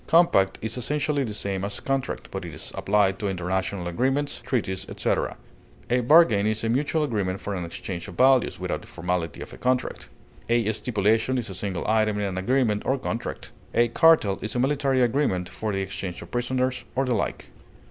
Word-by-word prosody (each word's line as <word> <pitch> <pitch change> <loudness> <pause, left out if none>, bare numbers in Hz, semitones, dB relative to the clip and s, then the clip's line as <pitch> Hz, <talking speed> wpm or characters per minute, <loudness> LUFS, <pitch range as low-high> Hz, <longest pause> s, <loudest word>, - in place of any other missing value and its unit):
Compact 100 - +4
is 110 +2 -3
essentially 145 +2 0
the 115 - -4
same 100 -2 -3
as 100 +1 -3
contract, 135 -1 -2
but - - -4
is - - -7
applied 100 -2 +2
to 105 - -1
international 95 0 -2
agreements, 135 +10 0
treaties, 100 -7 -2
etc. - - -1 0.5
A 125 - +4
bargain 125 -6 +5
is 110 +1 -1
a 115 - 0
mutual 145 +6 +1
agreement 100 -8 -1
for 100 - -4
an 90 -2 -3
exchange 85 +1 -6
of - - -10
values, 130 -1 +4
without - - -2
the - - -14
formality 90 -2 -3
of - - -8
a - - -11
contract. 125 0 -1 0.4
A 115 -2 +3
stipulation 110 +2 +1
is 120 -5 -3
a - - -5
single 95 -1 -3
item 110 -1 +2
in 105 - -1
an 95 -1 -2
agreement 115 0 +1
or 135 - +1
contract. 120 -2 -4 0.2
A 120 0 +4
cartel 155 - +4
is 110 - -4
a - - +1
military 135 -1 +2
agreement 115 -8 +1
for 110 +3 -4
the 95 -1 -1
exchange 95 -2 -5
of - - -14
prisoners 130 +1 -1
or 135 +1 +2
the 125 - +1
like. 100 - -2
110 Hz, 190 wpm, -25 LUFS, 95-130 Hz, 0.5 s, bargain